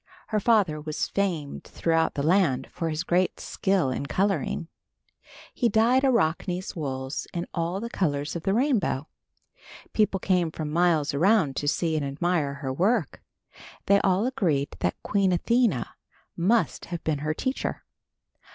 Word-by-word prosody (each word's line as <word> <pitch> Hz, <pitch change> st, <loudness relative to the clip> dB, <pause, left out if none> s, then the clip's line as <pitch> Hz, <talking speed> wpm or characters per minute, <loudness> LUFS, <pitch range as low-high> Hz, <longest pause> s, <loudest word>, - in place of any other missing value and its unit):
Her 215 Hz, -, +1 dB
father 195 Hz, -9 st, +2 dB
was 155 Hz, 0 st, -3 dB
famed 175 Hz, -8 st, -2 dB
throughout 165 Hz, -1 st, 0 dB
the 140 Hz, -, -1 dB
land 155 Hz, -6 st, +2 dB
for 165 Hz, -2 st, -3 dB
his 155 Hz, +2 st, -2 dB
great 180 Hz, +1 st, +1 dB
skill 190 Hz, -9 st, 0 dB
in 140 Hz, +2 st, -3 dB
coloring. 190 Hz, -4 st, 0 dB, 0.9 s
He 240 Hz, -, +1 dB
dyed 235 Hz, +4 st, +3 dB
Arachne's 185 Hz, -6 st, 0 dB
wools 130 Hz, -3 st, -4 dB
in 170 Hz, 0 st, -2 dB
all 170 Hz, +2 st, -1 dB
the 230 Hz, -, -4 dB
colors 145 Hz, -4 st, -1 dB
of 170 Hz, -, -3 dB
the 195 Hz, +4 st, 0 dB
rainbow. 225 Hz, -, +1 dB, 0.9 s
People 210 Hz, -3 st, +2 dB
came 180 Hz, -3 st, +1 dB
from 155 Hz, -1 st, -5 dB
miles 165 Hz, -4 st, +2 dB
around 165 Hz, -2 st, +3 dB
to 145 Hz, -, -2 dB
see 160 Hz, +1 st, +1 dB
and 155 Hz, -, 0 dB
admire 145 Hz, 0 st, -1 dB
her 135 Hz, -1 st, -4 dB
work. 195 Hz, -, 0 dB, 0.6 s
They 200 Hz, 0 st, +5 dB
all 190 Hz, +3 st, +2 dB
agreed 175 Hz, -, 0 dB
that 90 Hz, -, 0 dB
Queen 200 Hz, -2 st, +2 dB
Athena 205 Hz, -, +1 dB, 0.5 s
must 215 Hz, +7 st, +1 dB
have 175 Hz, -2 st, -6 dB
been 155 Hz, -3 st, -1 dB
her 155 Hz, +1 st, -2 dB
teacher. 260 Hz, +9 st, -3 dB
175 Hz, 150 wpm, -26 LUFS, 150-200 Hz, 0.9 s, They